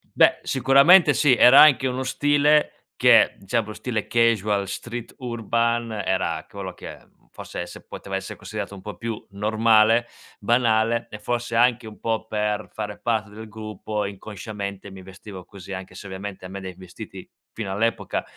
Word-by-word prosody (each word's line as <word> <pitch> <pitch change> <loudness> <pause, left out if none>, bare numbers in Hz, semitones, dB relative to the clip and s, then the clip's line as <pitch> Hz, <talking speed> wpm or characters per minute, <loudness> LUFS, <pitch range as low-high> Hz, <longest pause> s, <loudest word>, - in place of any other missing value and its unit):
Beh, - - +4
sicuramente 140 +5 +5
sì. 140 -4 +4
Era 125 +3 +8
anche 140 -3 +6
uno 130 +1 -3
stile 145 +2 +1
che - - +5
cioè, 120 - 0
un 115 - +2
po' 110 - -8
stile 115 -3 -3
casual, 105 -4 +1
street 120 +4 -7
urban 115 -1 -1
era 95 -5 -2
ch - - -32
quello 95 -3 -7
che, - - -10
mhmm, - - -31
forse - - -7
esse - - -9
poteva - - -8
esse - - -5
considerato 100 - -7
un 95 - -11
po' 105 -1 -8
più 115 0 -6
normale, 110 +2 +3 0.3
banale. 115 0 +1
E 105 - -8
forse 120 +1 -3
anche 120 -1 +2
un 105 - -12
po' 110 -1 -2
per 105 0 -2
fare 105 -1 -6
parte 110 -3 -1
del 110 +1 -10
gruppo 105 -1 -5
inconsciamente 100 0 -7
mi 95 0 -11
vestivo 95 0 -11
così 100 -1 -10
anche 95 0 -8
se, - - -10
ovviamente, 95 0 -7
a - - -6
me 95 +1 -8
dai 95 -1 -8
vestiti, 90 -2 -11 0.2
fino 105 -4 -6
all'epoca 115 +4 -1
110 Hz, 175 wpm, -23 LUFS, 100-120 Hz, 0.3 s, Era